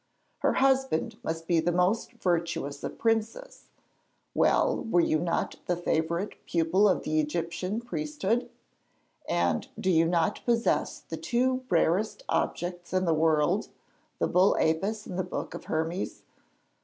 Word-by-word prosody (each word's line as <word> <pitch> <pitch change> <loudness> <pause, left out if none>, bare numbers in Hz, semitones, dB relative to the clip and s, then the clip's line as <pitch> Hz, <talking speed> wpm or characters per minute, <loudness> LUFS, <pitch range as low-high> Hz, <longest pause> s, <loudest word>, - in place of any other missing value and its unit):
Her - - +2
husband 265 -9 +1
must 165 0 -3
be 170 -2 +3
the 165 +2 +1
most 180 +7 +1
virtuous 170 -8 -2
of - - -5
princes. 225 - -1 0.7
Well, - - +2
were 200 -6 +2
you 155 -2 +2
not 170 +1 -1
the 175 - +1
favourite 170 +3 -1
pupil 175 +5 +3
of 185 - +1
the 155 0 0
Egyptian 170 +7 -2
priesthood? 240 -3 -2 0.8
And 85 -2 +1
do 190 -4 +1
you 165 -1 +4
not 170 -1 0
possess 235 -1 +1
the - - -7
two 255 +1 0
rarest 185 - +1
objects 175 0 -2
in 185 0 +2
the 165 - +3
world, 160 +4 +2 0.5
the - - +1
bull 185 +2 +4
Apis 200 +7 0
and 180 - -5
the - - +1
book 180 - -5
of - - -8
Hermes? 165 +4 -3
180 Hz, 145 wpm, -28 LUFS, 165-220 Hz, 0.8 s, you